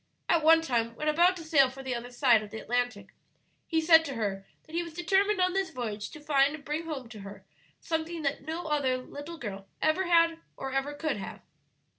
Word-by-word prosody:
At 335 - +3
one 325 +1 +6
time, 230 -5 -1
when 305 - -4
about 345 +4 +4
to 330 - -8
sail 290 -5 +4
for 270 +1 -10
the 260 -1 -2
other 240 0 -5
side 240 -3 +4
of 210 - -9
the 220 - -7
Atlantic, 245 +2 -2 0.5
he 325 - +1
said 325 0 +6
to 275 -3 -5
her 195 -3 -3 0.2
that 315 - -18
he 340 - +1
was 335 -2 -8
determined 390 +4 +2
on 365 0 +2
this 385 -1 0
voyage 220 -7 -5
to 305 - -11
find 290 -1 +2
and 290 -3 -13
bring 305 +3 -3
home 285 -6 -5
to 220 -2 -10
her 200 0 -10 0.3
something 320 0 -3
that 280 0 -1
no 320 +4 -5
other 285 -5 +1
little 290 +6 -8
girl 195 -7 -7
ever 350 +4 +1
had 335 -1 +4 0.2
or 270 - -5
ever 275 +2 -1
could 300 -4 -2
have." 195 - -7
295 Hz, 220 wpm, -29 LUFS, 245-330 Hz, 0.5 s, one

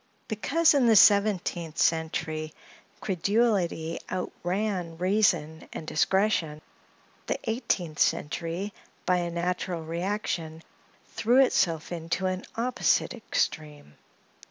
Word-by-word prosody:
Because, 320 +10 +2
in 270 -4 +3
the 225 - +5
seventeenth 190 -6 +3
century, 160 -1 -1 0.5
credulity 190 -4 0
outran 185 -1 -3
reason 175 -5 +1
and - - -7
discretion; 165 -2 +1 0.7
the - - 0
eighteenth 220 - -2
century, 170 +6 -1 0.3
by 180 - +3
a 175 -1 -1
natural 175 0 -2
reaction, 165 -2 -3 0.5
threw 240 +3 +2
itself 170 -11 0
into 170 +2 -3
an 185 0 -2
opposite 245 +2 +1
extreme. 150 - -3
180 Hz, 95 wpm, -27 LUFS, 160-210 Hz, 0.7 s, the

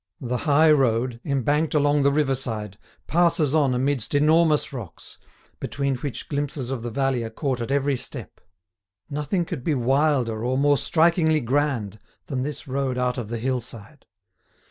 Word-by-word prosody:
The 125 0 -2
high 155 +2 +6
road, 125 -4 +1
embanked 145 +3 0
along 145 0 +3
the 140 0 +3
riverside, 125 -8 -2 0.3
passes 165 -4 +2
on 140 -5 +3
amidst 135 0 0
enormous 155 0 +3
rocks, 115 -10 -9 0.4
between 140 -1 -2
which 135 +1 -6
glimpses 140 -3 -3
of 130 -4 -3
the 120 - -4
valley 130 0 0
are 115 - -4
caught 130 +1 -3
at 115 - -4
every 140 0 +1
step. - - -7 0.7
Nothing 150 +5 -1
could 155 -7 -6
be 155 0 +1
wilder 130 -3 +1
or 130 +2 0
more 145 0 +3
strikingly 160 -1 +3
grand 125 -6 -1 0.3
than 130 -2 -3
this 145 +2 -5
road 135 -1 -2
out 125 0 0
of 110 -3 -6
the 120 - -3
hillside. 125 +2 -5
135 Hz, 155 wpm, -24 LUFS, 125-150 Hz, 0.7 s, high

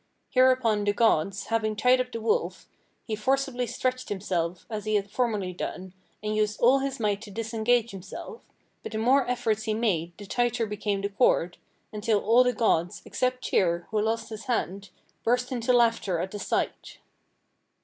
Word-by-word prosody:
Hereupon 255 -5 +3
the 205 0 +1
gods, 195 -3 +2
having 220 -1 +1
tied 250 +3 +4
up 250 0 -5
the 230 - -4
wolf, 440 - -1 0.4
he 220 - -2
forcibly 260 +2 0
stretched 255 +1 -2
himself 180 -3 -2
as 215 -2 -5
he 215 0 +1
had 200 0 -1
formerly 210 -6 -1
done, 185 +1 -6 0.3
and 215 0 -1
used 210 -1 0
all 255 +3 +5
his 270 -1 -3
might 205 -2 0
to 220 - -9
disengage 230 +2 0
himself, 195 - -9 0.4
but - - -7
the - - -2
more 250 +4 +3
efforts 220 -3 0
he 215 -1 0
made 175 -7 -1
the 205 - -9
tighter 240 +2 0
became 205 -1 -2
the 200 - -1
cord, 195 -5 +2 0.3
until 210 0 +1
all 230 +5 +5
the 250 - +2
gods, 195 -7 0
except 255 0 -1
Tyr, 170 -2 +1
who 215 -1 +1
lost 225 +1 -1
his 220 +1 -8
hand, 200 -6 -2 0.3
burst 245 +2 +1
into 245 0 0
laughter 230 -6 +3
at 180 +3 -3
the 205 - -6
sight. - - -2
220 Hz, 175 wpm, -27 LUFS, 200-245 Hz, 0.4 s, all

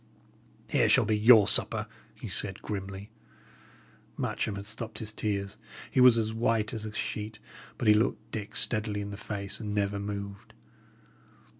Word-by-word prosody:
"Here - - +3
shall - - +5
be 110 - +2
your 110 -1 +7
supper," - - +2 0.3
he - - -8
said, 95 -1 -3
grimly. 100 0 -5 1.1
Matcham 105 - -2
had 100 0 -6
stopped 110 0 -6
his 110 0 -4
tears; 100 -2 -2 0.3
he 130 - +3
was 125 -2 +8
as 110 -1 0
white 115 -1 +1
as 110 -1 -4
a - - -6
sheet, 105 0 -4 0.4
but 115 - -2
he 105 - +8
looked 110 +3 0
Dick 105 -2 -5
steadily 105 -2 0
in 100 0 -5
the - - -5
face, 100 -2 -5
and 105 -2 -4
never 100 0 0
moved. 100 -1 -6
105 Hz, 160 wpm, -29 LUFS, 100-110 Hz, 1.1 s, was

